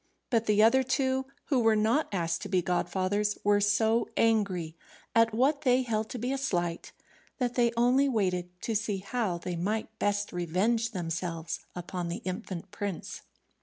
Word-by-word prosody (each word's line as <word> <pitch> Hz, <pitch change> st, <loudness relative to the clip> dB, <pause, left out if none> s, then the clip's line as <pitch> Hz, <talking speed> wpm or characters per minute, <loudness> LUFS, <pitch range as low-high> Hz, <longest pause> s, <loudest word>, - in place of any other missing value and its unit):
But 230 Hz, -2 st, +2 dB
the 210 Hz, 0 st, +4 dB
other 245 Hz, +4 st, +6 dB
two, 260 Hz, 0 st, 0 dB, 0.2 s
who 270 Hz, -4 st, +3 dB
were 225 Hz, -2 st, +4 dB
not 225 Hz, +8 st, +2 dB
asked 165 Hz, -4 st, -1 dB
to -, -, -6 dB
be 185 Hz, -3 st, +2 dB
godfathers, 185 Hz, +4 st, 0 dB
were 205 Hz, 0 st, +3 dB
so 220 Hz, +3 st, +2 dB
angry 200 Hz, -8 st, +1 dB, 0.4 s
at 230 Hz, 0 st, +4 dB
what 270 Hz, +6 st, +2 dB
they 255 Hz, -2 st, +3 dB
held 220 Hz, -2 st, -1 dB
to -, -, -5 dB
be 245 Hz, +3 st, -2 dB
a 275 Hz, -, -1 dB
slight, 175 Hz, -10 st, -2 dB, 0.5 s
that 245 Hz, -2 st, -1 dB
they 240 Hz, -2 st, +3 dB
only 255 Hz, +4 st, +4 dB
waited 180 Hz, -7 st, 0 dB
to 230 Hz, -, -1 dB
see 210 Hz, -1 st, 0 dB
how 195 Hz, -1 st, -2 dB
they 175 Hz, +1 st, -4 dB
might 215 Hz, +5 st, -3 dB
best 205 Hz, 0 st, 0 dB
revenge 190 Hz, +7 st, +1 dB
themselves 165 Hz, -3 st, -3 dB, 0.2 s
upon 175 Hz, 0 st, -4 dB
the 170 Hz, -, -5 dB
infant 185 Hz, -1 st, -5 dB
prince. 200 Hz, -4 st, -5 dB
210 Hz, 165 wpm, -29 LUFS, 180-235 Hz, 0.5 s, other